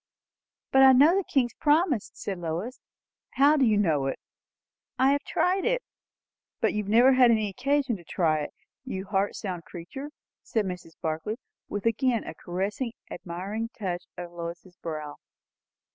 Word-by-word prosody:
"But 265 - +6
I 265 0 +9
know 295 +7 +6
the 390 - +2
King's 255 -7 +1
promise," 300 - +2
said 195 -3 -5
Lois. 175 +9 -4 0.5
"How 285 +3 +5
do 275 -3 +4
you 215 -2 +3
know 155 -9 +2
it?" 135 - -2 0.8
"I 265 +1 +4
have 285 0 +2
tried 370 +5 +1
it." - - +1 0.8
"But - - +2
you 210 - 0
have 200 - -7
never 245 +5 +6
had 255 -2 +6
any 215 -3 +2
occasion 265 +1 0
to 175 - -15
try 160 -2 +1
it, 150 - -4 0.3
you 190 +1 -5
heart 200 0 0
sound 180 -5 -5
creature!" 180 - -8 0.3
said 220 -3 -1
Mrs. 180 -3 -6
Barclay, 160 +7 -2 0.3
with 205 0 -4
again 230 +1 +2
a - - -7
caressing, 200 +7 -3 0.2
admiring 195 +7 -4
touch 180 -4 -3
of 175 -1 -6
Lois's 175 +1 -7
brow. 155 -4 -6
210 Hz, 160 wpm, -27 LUFS, 175-265 Hz, 0.8 s, I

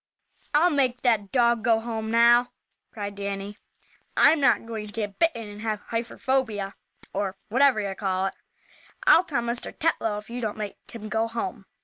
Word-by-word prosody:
"I'll 345 +4 +5
make 260 -4 +1
that 220 -6 +2
dog 235 -3 +3
go 225 -1 +4
home 225 -1 -4
now!" 235 +2 +5 0.4
cried 205 -3 -5
Danny. 200 +1 -5 0.6
"I'm 320 - +6
not 270 -4 +3
going 220 -2 -5
to - - -5
get 205 -2 -4
bitten, 240 -10 +1
and 205 0 -10
have 215 -2 -3
hyperfobia, 230 -3 -1 0.4
or 195 -1 -2
whatever 260 0 +4
you 200 -1 -3
call 190 -1 -1
it. 195 - -3 0.7
I'll 350 - +7
tell 270 -9 -2
Mr. 235 +1 -2
Tetlow 225 -10 0
if 210 - -9
you 245 +1 -5
don't 215 -2 -3
make 210 -2 -5
him 220 -2 -8
go 220 +1 0
home." 230 -2 -5
225 Hz, 170 wpm, -26 LUFS, 205-240 Hz, 0.7 s, I'll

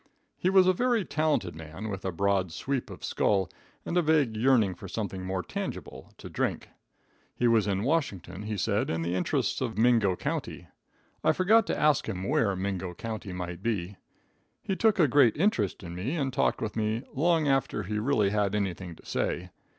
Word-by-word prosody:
He 185 - 0
was 190 -1 +6
a 185 - +5
very 240 0 +1
talented 155 - 0
man, 80 +6 -7
with 95 -2 -5
a 95 - 0
broad 95 0 +1
sweep 135 - -3
of - - -10
skull 95 -3 +1 0.3
and - - -3
a 175 - +5
vague 150 -8 +2
yearning 110 -4 +3
for 90 - -10
something 100 -4 -4
more 95 0 -2
tangible - - -6
to - - -9
drink. - - -2 0.7
He 120 - +2
was 115 -3 +3
in 100 0 0
Washington, 125 - -1
he 105 0 -4
said, - - 0
in 80 0 -1
the 85 +1 -1
interests 90 - 0
of - - -2
Mingo 115 -5 +4
county. - - -4 0.6
I - - +4
forgot 215 +5 +4
to - - -1
ask 150 -1 +3
him 95 -1 -4
where 100 -4 +2
Mingo 95 -2 -3
county 110 -1 -5
might 90 -1 -5
be. 100 -4 -2 0.7
He 195 - -1
took 220 +1 +3
a 165 -5 +5
great 130 -4 +4
interest 135 - +1
in 85 -1 -7
me, 100 - -3
and 135 -5 -1
talked - - +1
with 105 -1 -4
me 110 +2 -1
long 160 +1 +2
after 135 -6 +1
he 105 +3 -2
really 110 -4 +2
had 105 -1 +1
anything 95 -4 -3
to - - -19
say. 90 +1 -2
105 Hz, 190 wpm, -28 LUFS, 95-140 Hz, 0.7 s, was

